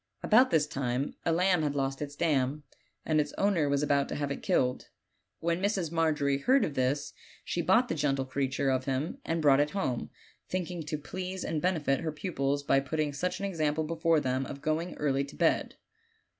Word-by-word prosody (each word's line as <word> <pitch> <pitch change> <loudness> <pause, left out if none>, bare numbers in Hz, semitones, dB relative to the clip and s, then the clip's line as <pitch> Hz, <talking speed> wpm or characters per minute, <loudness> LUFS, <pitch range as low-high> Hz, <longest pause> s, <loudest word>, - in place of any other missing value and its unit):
About 250 +5 +5
this 160 -3 +3
time 135 -2 -2
a - - +4
lamb 180 +1 +3
had 145 -2 -1
lost 135 0 -1
its 145 -1 -5
dam, 145 -2 0 0.4
and 155 -1 +3
its 145 - -5
owner 185 -8 +1
was 140 0 +1
about 140 -1 +2
to - - -3
have 145 -1 -2
it 140 - -4
killed. 125 0 0 0.5
When 170 +2 0
Mrs. 195 -5 0
Margery 150 -4 +1
heard 260 - +3
of 150 - -4
this 135 +2 -1 0.3
she 170 - -1
bought 225 +9 +4
the - - -1
gentle 140 -3 0
creature 135 0 0
of 130 0 0
him 135 +4 -2
and 165 -1 -2
brought 140 -2 +6
it 145 +1 +2
home, 125 -11 -2 0.4
thinking 180 -2 -3
to 155 0 -2
please 185 +5 -5
and 155 -2 -2
benefit 155 -6 +1
her 160 - -2
pupils 145 -4 -2
by 135 - +3
putting 150 +1 -2
such 180 +5 -2
an 200 - -3
example 160 -5 0
before 165 0 +2
them 130 -1 -1
of 140 - -7
going 160 +3 -1
early 140 -2 +1
to 140 +1 -10
bed. - - +1
150 Hz, 200 wpm, -30 LUFS, 140-170 Hz, 0.5 s, brought